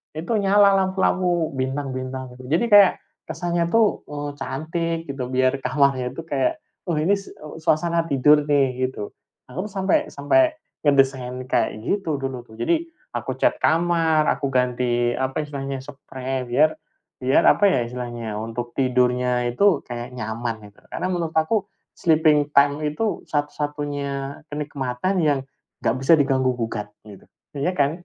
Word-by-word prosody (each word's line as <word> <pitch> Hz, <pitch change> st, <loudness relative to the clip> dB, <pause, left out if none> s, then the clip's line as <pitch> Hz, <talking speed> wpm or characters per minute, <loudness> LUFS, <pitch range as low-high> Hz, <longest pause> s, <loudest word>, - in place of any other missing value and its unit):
Itu 170 Hz, +8 st, -1 dB
nyala 200 Hz, 0 st, +5 dB
lampu-lampu, 185 Hz, -4 st, +1 dB
bintang-bintang, 130 Hz, -1 st, -4 dB
gitu, 125 Hz, 0 st, -11 dB
jadi 165 Hz, +9 st, +2 dB
kayak, 200 Hz, -2 st, +8 dB, 0.4 s
kesannya 170 Hz, -1 st, -1 dB
tuh, 225 Hz, +2 st, +3 dB
eee, 145 Hz, 0 st, -4 dB
cantik 165 Hz, +5 st, -2 dB, 0.2 s
gitu 130 Hz, -2 st, -5 dB
biar 130 Hz, +1 st, +1 dB
kamarnya 130 Hz, -1 st, +1 dB
itu 165 Hz, -, -6 dB
kayak 315 Hz, -, 0 dB, 0.3 s
oh 170 Hz, -, +1 dB
ini 155 Hz, +5 st, +1 dB
s 195 Hz, -, -11 dB
eee, 150 Hz, +1 st, -11 dB
suasana 165 Hz, +1 st, +1 dB
tidur 150 Hz, +2 st, +4 dB
nih 130 Hz, -3 st, +2 dB
gitu. 105 Hz, -5 st, -7 dB, 0.4 s
Aku 185 Hz, +10 st, -4 dB
tuh -, -, -14 dB
sampai 190 Hz, -1 st, +1 dB
sampai 310 Hz, -, +3 dB, 0.3 s
ngedesain 135 Hz, -3 st, +2 dB
kayak 110 Hz, -3 st, -1 dB
gitu 190 Hz, -, -1 dB
dulu 135 Hz, -2 st, -4 dB
tuh. 110 Hz, -, -14 dB
Jadi, 335 Hz, 0 st, 0 dB, 0.3 s
aku -, -, -3 dB
cat -, -, +1 dB
kamar, 165 Hz, -2 st, +2 dB
aku 140 Hz, -, -1 dB
ganti 125 Hz, -2 st, +1 dB
apa 130 Hz, +3 st, -2 dB
istilahnya, 135 Hz, -2 st, -5 dB
seprei 130 Hz, -2 st, -5 dB
biar 150 Hz, +6 st, +3 dB, 0.5 s
biar 130 Hz, +1 st, +3 dB
apa 205 Hz, -, +5 dB
ya 130 Hz, -10 st, +2 dB
istilahnya, 120 Hz, -3 st, -5 dB
untuk 115 Hz, +2 st, -5 dB
tidurnya 125 Hz, -1 st, +2 dB
itu 185 Hz, +4 st, +3 dB
kayak 120 Hz, +1 st, -7 dB
nyaman 110 Hz, -2 st, -4 dB
itu. -, -, -24 dB
Karena 185 Hz, -, -3 dB
menurut 170 Hz, -3 st, -2 dB
aku, 190 Hz, +6 st, +1 dB, 0.3 s
sleeping 155 Hz, -3 st, +3 dB
time 145 Hz, +1 st, +4 dB
itu 205 Hz, +9 st, -2 dB
satu-satunya 145 Hz, -2 st, -3 dB
kenikmatan 145 Hz, +4 st, -2 dB
yang 150 Hz, -4 st, +2 dB, 0.4 s
gak 115 Hz, -, +2 dB
bisa 135 Hz, +5 st, +5 dB
diganggu 135 Hz, -3 st, +2 dB
gugat 115 Hz, -3 st, -3 dB, 0.2 s
gitu. 105 Hz, -2 st, -13 dB, 0.3 s
Iya 180 Hz, +7 st, -1 dB
kan? 140 Hz, 0 st, +3 dB
140 Hz, 150 wpm, -23 LUFS, 125-165 Hz, 0.5 s, kayak